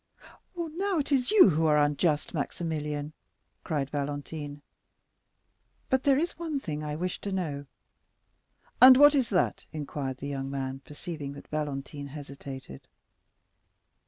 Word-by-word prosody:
"Now 345 +3 -1
it 295 -1 -1
is 260 -3 +2
you 420 - +8
who 160 +1 +2
are 150 -1 +4
unjust, 150 +1 +1
Maximilian," 150 -2 -3 0.5
cried 145 -5 -2
Valentine; 145 0 -4 1.3
"but 260 0 +2
there 275 -2 +5
is 335 +3 -2
one 320 -4 -2
thing 155 - -4
I 150 0 -3
wish 180 +3 -3
to 200 - -4
know." 150 -7 -3 1.1
"And 255 0 +11
what 290 +1 +8
is 265 -5 +2
that?" 185 -4 0
inquired 145 -4 -4
the 140 - -6
young 135 -1 -3
man, 135 -1 -3
perceiving 150 -2 -6
that 140 - -12
Valentine 145 -1 -4
hesitated. 140 - -9
150 Hz, 130 wpm, -28 LUFS, 140-205 Hz, 1.3 s, And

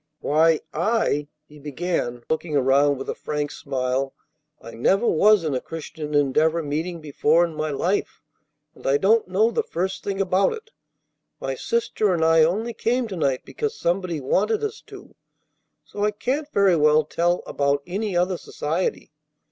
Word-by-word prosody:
"Why, 160 +2 +3
I," 170 -5 0 0.2
he 150 0 -15
began, 145 -5 -3
looking 160 -1 -1
around 140 +2 +3
with 135 - -7
a - - -2
frank 150 -1 -3
smile, 135 -1 -2 0.4
"I 115 - -11
never 195 - +2
was 210 +1 +4
in 155 -3 -1
a 130 - -1
Christian 155 -2 -6
Endeavor 155 +4 +2
meeting 160 +4 -3
before 155 +3 +2
in 165 - -7
my 155 0 -2
life, 175 +7 -1 0.5
and - - -9
I 135 +1 +4
don't 215 +6 +3
know 210 +5 +2
the - - +1
first 190 +3 -3
thing 200 -1 -3
about 195 0 +2
it. 450 0 -10 0.7
My - - -3
sister 420 - 0
and 160 -1 +1
I 165 0 +5
only 215 +9 0
came 245 +2 0
to 195 - -5
night 135 -6 -1
because 440 0 -3
somebody 175 -2 -1
wanted 205 - 0
us 430 0 -4
to; - - -13 0.7
so 205 - -5
I 210 - +3
can't 275 +8 -3
very 195 -3 +4
well 150 -1 +4
tell 175 +3 0
about 140 0 0
any 195 +1 -2
other 180 +1 +1
society. 160 +5 -3
165 Hz, 165 wpm, -23 LUFS, 145-200 Hz, 0.7 s, I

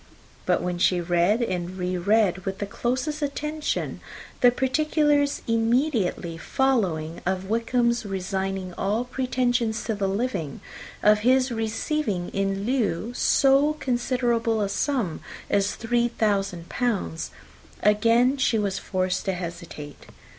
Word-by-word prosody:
But - - +2
when 180 -1 -2
she 180 0 +3
read 175 +6 +2
and 185 -3 -3
re 180 0 -2
read, 195 0 +2
with 190 +1 -3
the 205 - -3
closest 260 +9 -2
attention, 300 +2 -2 0.4
the 245 - +7
particulars 290 +2 +1
immediately 230 - +1
following 175 -12 0
of 190 +2 -2
Wickham's 235 +1 +1
resigning 190 -1 -3
all 210 +5 0
pretensions 245 -3 0
to 225 - -1
the 200 -2 -1
living, 195 - -2 0.4
of 210 0 +6
his 255 +3 +3
receiving 225 - -1
in 195 0 -1
lieu 235 -3 0
so 275 +4 +4
considerable 240 -4 0
a 200 - 0
sum 225 - -1 0.3
as 200 0 +2
three 240 +1 +1
thousand 195 -7 -1
pounds, 210 -9 -2 0.5
again 230 +5 +4 0.2
was 205 -3 0
she - - -6
forced 185 -1 -1
to 195 - 0
hesitate. 170 -4 -8
220 Hz, 125 wpm, -25 LUFS, 190-250 Hz, 0.5 s, the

